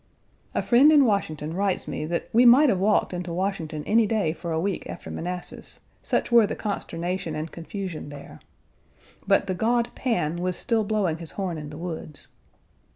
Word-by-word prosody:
A - - +1
friend 260 +5 +6
in 290 -3 +6
Washington 160 - -1
writes 195 0 -1
me 150 - -3
that 170 +2 -2
we 235 +3 +6
might 260 +4 +7
have 195 -5 +2
walked 205 -1 +2
into 175 -1 -4
Washington 170 -4 -2
any 220 0 +3
day 200 -8 0
for 170 +1 -6
a 160 - 0
week 190 +2 -2
after - - -7
Manassas, 180 +1 -6 0.2
such - - -1
were 230 -3 +6
the - - -3
consternation 175 -4 -3
and 155 +1 -4
confusion 175 -2 -6
there. 145 - -11 0.9
But - - +4
the 190 - -2
god 235 +5 +1
Pan 175 - -1
was 180 0 -1
still 230 +1 +1
blowing 200 -6 0
his 165 -2 -4
horn 180 -5 -3
in 150 -1 -7
the 150 - -9
woods. 160 -3 -6
180 Hz, 180 wpm, -25 LUFS, 165-215 Hz, 0.9 s, might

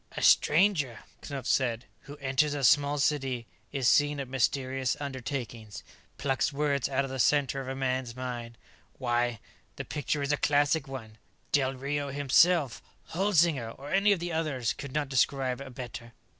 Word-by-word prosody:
"A - - -2
stranger," 150 - +4 0.2
Knupf 140 -4 -6
said, 120 -4 +1 0.2
"who 145 +1 -10
enters 140 +2 +1
a 140 - -3
small 145 +3 +4
city, 135 -4 0 0.3
is 135 -3 0
seen 145 +2 +4
at 135 - -4
mysterious 130 0 0
undertakings, 130 -6 -5 0.3
plucks 135 +1 0
words 140 -2 0
out 140 0 0
of 135 - -7
the 135 - -5
center 135 +2 +2
of 130 - -8
a 135 - -3
man's 130 -2 -2
mind... 120 -2 -6 0.4
why, 120 -2 0 0.4
the - - -6
picture 145 0 -2
is 140 - 0
a 145 - +2
classic 145 +1 +2
one. 110 -5 -9 0.3
Del 135 -2 +2
Rio 140 +2 -3
himself, 145 +1 +3 0.3
Holzinger 170 - +2
or 140 +2 -9
any 200 +2 +4
of 200 - +2
the 175 0 -4
others 145 -7 -1
could 140 - -8
not 150 +1 -1
describe 130 -1 +1
a 135 - -7
better." 120 -2 -8
135 Hz, 165 wpm, -29 LUFS, 130-145 Hz, 0.4 s, stranger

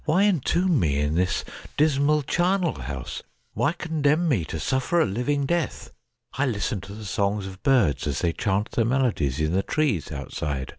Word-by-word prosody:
why 170 +5 +3
entomb 180 -3 +2
me 75 -7 +1
in 75 +1 0
this 90 +2 0 0.3
dismal 150 0 +3
charnel 180 +3 +1
house? 65 0 -6 0.3
why 145 - +1
condemn 160 -1 +1
me 120 - +2
to 80 0 -5
suffer 130 - +1
a - - +4
living 125 +8 -1
death? 170 +3 -2 0.4
I 145 +1 0
listen 105 -2 -2
to 95 +4 -9
the 110 0 -8
songs 100 +1 -1
of 95 - -6
the - - 0
birds 85 - +3
as 70 - -1
they 85 -2 +1
chant 105 +1 -1
their 115 - +1
melodies 110 - 0
in 75 0 +1
the 95 - +2
trees 105 - -1
outside. 70 -1 -4
120 Hz, 185 wpm, -25 LUFS, -, 0.4 s, a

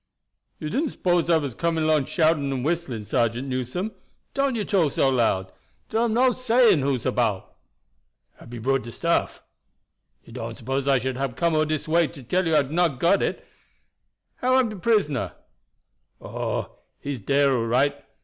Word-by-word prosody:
"You 155 - -5
didn't 290 +6 0
s'pose 175 -2 +1
I 165 - +5
was 140 -5 -3
coming 165 +4 -1
along 155 -3 +2
shouting 155 -3 +1
and 130 -1 -3
whistling, 155 -9 -2
Sergeant 120 +4 0
Newson? 130 - -3 0.4
Don't 275 -2 0
you 215 -3 -2
talk 170 -8 +1
so 135 - +3
loud. 110 -7 +1 0.4
Dar 225 +2 +2
am 225 -2 0
no 255 +1 +4
saying 245 -6 +3
who's 135 -3 -1
about." 115 -6 -1 0.8
"Hab - - -14
you 120 -2 -7
brought 135 +2 +1
de 115 - -8
stuff?" 170 +7 -1 0.8
"You - - -15
don't - - -6
suppose 135 +3 -3
I 135 -1 +4
should 130 +1 -3
hab 135 -3 -3
come 170 +2 +1
all 155 0 +3
dis 155 0 -3
way 165 +1 +3
to 140 - -12
tell 180 +8 0
you 160 - +2
I 150 - +5
hab 135 - -10
not 165 -5 +1
got 175 +7 +3
it. - - -2 0.9
How 255 +1 +2
am 255 -3 +3
de 215 - -7
prisoner?" 150 - 0 0.9
"Oh, - - -4 0.2
he's 140 -5 -5
dere 140 +4 +2
all 115 -2 -1
right. 130 +5 +1
145 Hz, 180 wpm, -24 LUFS, 130-175 Hz, 0.9 s, I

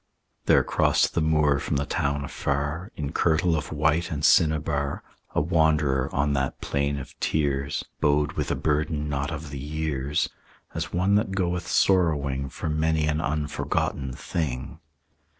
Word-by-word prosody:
There - - +5
crossed - - +2
the 85 - +1
moor 75 -3 +3
from - - -2
the 70 0 0
town 70 0 -1
afar, 75 +8 -2
In 75 -2 -4
kirtle 80 +1 +2
of 75 - -3
white 75 +2 +1
and 75 -2 -1
cinnabar, 75 -4 +2 0.3
A - - +3
wanderer 75 -5 +2
on 70 +1 +1
that 65 -1 -1
plain 70 0 -1
of 70 0 -8
tears, 70 -2 0
Bowed 75 0 +2
with - - -3
a - - +1
burden 75 0 0
not 70 0 -1
of 80 -2 -6
the 70 - -5
years, 75 -1 -1 0.5
As - - -3
one 90 +3 +1
that 105 -2 -1
goeth 90 -2 -1
sorrowing 70 -7 +2
For - - -5
many 80 0 +1
an 75 0 0
unforgotten 75 -3 -2
thing. 70 +1 -4
75 Hz, 150 wpm, -26 LUFS, 70-80 Hz, 0.5 s, There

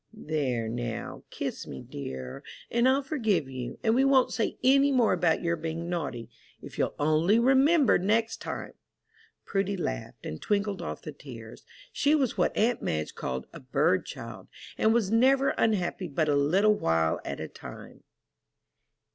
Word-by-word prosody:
There, 130 -7 -1
now, 120 0 -4
kiss - - -5
me, 65 - -8
dear, 65 -2 -7 0.3
and 235 +2 +3
I'll 275 +2 +2
forgive 225 - 0
you, 130 -2 -6
and 220 - +3
we 260 +3 +4
won't 270 -2 +4
say 225 - -1
any 275 +2 +5
more 250 -4 +3
about 165 0 +1
your 170 0 +1
being 165 +1 -4
naughty, 140 -9 -3 0.3
if - - -11
you'll - - 0
only 155 +8 +3
remember 270 +4 +4
next 220 +4 +1
time." - - -6 0.7
Prudy 195 0 -1
laughed, - - -5
and 80 - -6
twinkled 200 -2 -1
off 170 - -6
the 155 - -6
tears. 115 -6 -11 0.3
She 290 +2 +3
was 270 -6 +1
what - - 0
aunt 235 +2 +2
Madge 75 -1 -2
called 65 0 -4
a - - -9
"bird - - +1
child," - - -8 0.3
and 220 - +3
was 225 -4 +1
never 265 +4 +4
unhappy 190 -4 0
but 155 +1 0
a 145 - +3
little 185 +10 +4
while 80 - +1
at - - -5
a - - -4
time. - - -11
185 Hz, 165 wpm, -28 LUFS, -, 0.7 s, any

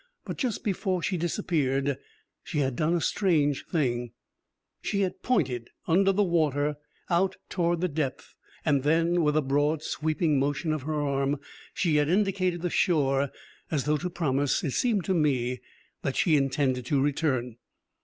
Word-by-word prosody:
But - - -6
just 245 -6 -1
before 185 -3 -1
she 190 - 0
disappeared, 145 -6 0 0.5
she - - -5
had 135 -3 +1
done 160 +6 +1
a 170 - 0
strange 155 -9 +1
thing. 120 -7 -1 0.7
She 200 -1 -1
had 185 -2 -2
pointed, 130 - 0 0.2
under 195 +3 +4
the 205 +2 +2
water, 150 -5 +1 0.3
out 185 +2 +2
towards 170 -1 0
the 180 - +2
depth, 150 -4 -3 0.3
and 145 -3 +3
then, 165 +4 +2
with 150 -1 +2
a 155 - +2
broad, 145 +3 +1
sweeping 155 -1 0
motion 145 +3 0
of 155 - -2
her 155 +2 -2
arm, 140 0 0 0.4
she 160 -5 +2
had 150 0 +2
indicated 185 -2 +1
the 175 - -1
shore, 140 -6 +2 0.4
as 145 -4 0
though 150 +1 +1
to 180 +5 -3
promise, 145 -5 0
it 145 - -1
seemed 210 - +1
to 190 - +1
me, 125 -7 +1 0.4
that 135 - -2
she 165 -4 +3
intended 135 -2 +1
to 140 - +2
return. 135 -4 0
150 Hz, 165 wpm, -27 LUFS, 140-175 Hz, 0.7 s, under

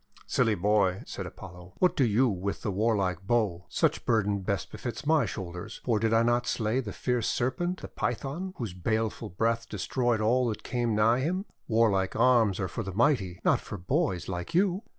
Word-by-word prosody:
:< - - -25
Silly 110 -2 +2
Boy," 100 0 +2
said - - -6
Apollo, 90 +1 -11
"what 180 - +3
do 135 - +3
you 120 +3 +3
with 100 -2 -3
the 105 - -1
warlike 95 -3 0
bow? 105 -7 +1
Such - - +1
burden 105 -3 +1
best 100 +1 -3
befits 120 +3 -6
my 155 0 +3
shoulders, 95 +2 -6
for 115 -4 +1
did 110 +1 +1
I 115 0 +4
not 120 +1 +1
slay 110 +2 0
the 115 -6 -4
fierce 125 +2 -1
Serpent, 175 +9 -1
the - - -4
Python, 155 +10 -3
whose 110 -7 -4
baleful 110 +4 -2
breath 115 +5 -1
destroyed 120 +3 0
all 120 +4 +2
that 110 - -4
came 120 -3 -1
nigh 110 +3 +4
him? 180 +8 -1 0.2
Warlike 105 -4 +2
arms 115 -6 +4
are 95 - -1
for 105 - -4
the 95 -3 -5
mighty, 105 -8 +1
not - - +3
for 105 - -7
boys 95 - -1
like 90 - -4
you! 190 +1 +2
110 Hz, 190 wpm, -28 LUFS, 100-125 Hz, 0.2 s, I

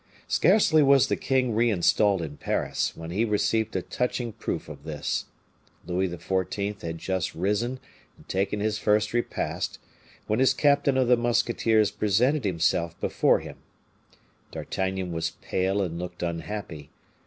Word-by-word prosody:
Scarcely 180 -4 +4
was 135 -1 +5
the - - +2
king 130 -3 0
reinstalled 105 -3 +3
in 75 -2 -7
Paris, - - -2
when 80 0 -7
he 100 +6 +1
received 110 0 0
a 95 - -1
touching 125 -2 -2
proof 110 -6 -4
of 70 -2 -10
this. 75 -2 -3 0.6
Louis 90 +2 0
XIV. 95 +3 -3
had 85 0 -4
just 95 +1 -2
risen 105 +8 -1 0.4
and - - -19
taken 100 +2 -1
his 110 0 0
first 105 +1 +2
repast 120 0 -2 0.5
when 110 +2 0
his 130 - +4
captain 140 -2 +3
of 130 -2 +2
the 125 0 +5
musketeers 115 -2 +2
presented 110 +7 +1
himself 85 -2 0
before - - +2
him. - - -9 0.9
D'Artagnan 95 -1 -3
was 80 -1 -2
pale 95 +2 0
and 85 -2 -4
looked 90 0 -6
unhappy. 85 -2 -5
105 Hz, 145 wpm, -26 LUFS, 90-120 Hz, 0.9 s, was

